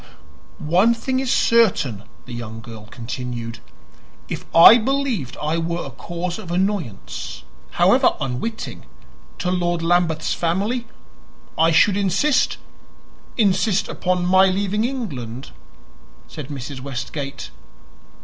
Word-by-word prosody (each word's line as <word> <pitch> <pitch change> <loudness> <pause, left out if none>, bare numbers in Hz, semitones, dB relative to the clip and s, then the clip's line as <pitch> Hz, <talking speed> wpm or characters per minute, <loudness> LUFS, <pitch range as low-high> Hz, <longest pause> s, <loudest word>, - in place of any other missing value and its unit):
"One 220 +7 +5
thing 260 +3 -1
is 265 -1 -1
certain," 185 - +2 0.2
the 125 - -9
young 115 -1 -6
girl 110 -2 -11
continued. 120 -1 -6 0.7
"If - - -5
I 175 +8 +10
believed 250 - -1
I 155 +2 -1
were 170 +1 -2
a 135 - -7
cause 175 - -5
of 195 -6 -9
annoyance 170 - -3 0.3
however - - +4
unwitting 135 - -4 0.5
to 180 - -1
Lord 175 -2 0
Lambeth's 165 -2 +1
family, 205 +8 -1 0.7
I 160 +1 +4
should 190 +4 +4
insist 205 - +2 0.4
" - - -28
"Insist 200 -2 +2
upon 180 0 -1
my 190 +1 +5
leaving 200 +3 0
England," 140 - -5 0.8
said 150 -4 -8
Mrs. 135 -1 -6
Westgate. 140 +1 -6
175 Hz, 115 wpm, -21 LUFS, 130-205 Hz, 0.8 s, I